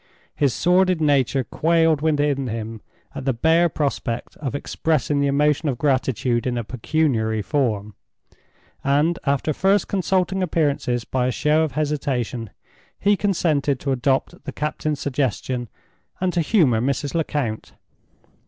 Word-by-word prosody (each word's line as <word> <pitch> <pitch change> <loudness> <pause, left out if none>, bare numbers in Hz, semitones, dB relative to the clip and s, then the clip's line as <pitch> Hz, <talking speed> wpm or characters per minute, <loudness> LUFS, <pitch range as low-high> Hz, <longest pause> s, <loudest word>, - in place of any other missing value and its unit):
His 140 -3 +2
sordid 180 - +2
nature 140 -3 +2
quailed 165 +1 +2
within 145 -3 +1
him 110 -1 -5 0.3
at - - -6
the 135 - +2
bare 165 +8 +3
prospect 135 -6 -3
of 140 -2 -4
expressing 145 -1 0
the 140 - +2
emotion 150 +2 +2
of 130 - -2
gratitude 130 -3 0
in 125 -1 -1
a 120 - -2
pecuniary 115 -3 0
form; 110 -8 -1 0.9
and, 150 +5 +2
after 140 +2 +1
first 195 +4 +2
consulting 190 0 0
appearances 145 -8 0
by 125 -1 0
a - - +1
show 150 +5 +2
of 155 -5 -1
hesitation, 135 -6 -2 0.5
he 205 +1 +3
consented 155 -9 0
to 140 - -1
adopt 130 +1 0
the - - -5
captain's 150 -1 -3
suggestion, 130 -3 -2 0.5
and 185 -1 0
to 175 - +2
humor 150 - +3
Mrs. 140 +2 -1
Lecount. 145 -9 -2
140 Hz, 135 wpm, -22 LUFS, 125-160 Hz, 0.9 s, bare